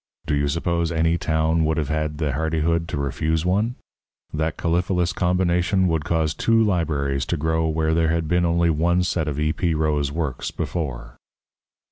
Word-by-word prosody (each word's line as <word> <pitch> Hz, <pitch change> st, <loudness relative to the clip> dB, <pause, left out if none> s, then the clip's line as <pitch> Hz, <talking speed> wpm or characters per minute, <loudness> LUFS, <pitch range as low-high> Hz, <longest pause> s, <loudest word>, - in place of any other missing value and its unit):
Do -, -, -1 dB
you 70 Hz, 0 st, +1 dB
suppose 85 Hz, +2 st, -1 dB
any 80 Hz, +1 st, +1 dB
town 80 Hz, 0 st, +1 dB
would 80 Hz, +1 st, 0 dB
have 75 Hz, -3 st, -1 dB
had 75 Hz, -1 st, -1 dB
the 75 Hz, -2 st, -1 dB
hardihood 80 Hz, +2 st, 0 dB
to 85 Hz, -, -4 dB
refuse 80 Hz, +3 st, -1 dB
one? 105 Hz, +7 st, +1 dB, 0.6 s
That 80 Hz, +1 st, -1 dB
caliphalous 90 Hz, 0 st, 0 dB
combination 90 Hz, +1 st, +1 dB
would 80 Hz, -3 st, -1 dB
cause 80 Hz, -2 st, 0 dB
two 115 Hz, +6 st, +2 dB
libraries 80 Hz, -10 st, 0 dB
to -, -, -1 dB
grow 80 Hz, +2 st, 0 dB
where 80 Hz, 0 st, 0 dB
there 80 Hz, 0 st, +2 dB
had 80 Hz, -1 st, 0 dB
been 90 Hz, +2 st, +2 dB
only 85 Hz, 0 st, +2 dB
one 85 Hz, +3 st, +2 dB
set 85 Hz, -3 st, -1 dB
of 75 Hz, -1 st, -2 dB
E. 75 Hz, +1 st, +1 dB
P. 85 Hz, -3 st, 0 dB
Roe's 75 Hz, -2 st, 0 dB
works 75 Hz, -5 st, -3 dB
before. 60 Hz, -8 st, -5 dB
80 Hz, 175 wpm, -23 LUFS, 75-85 Hz, 0.6 s, two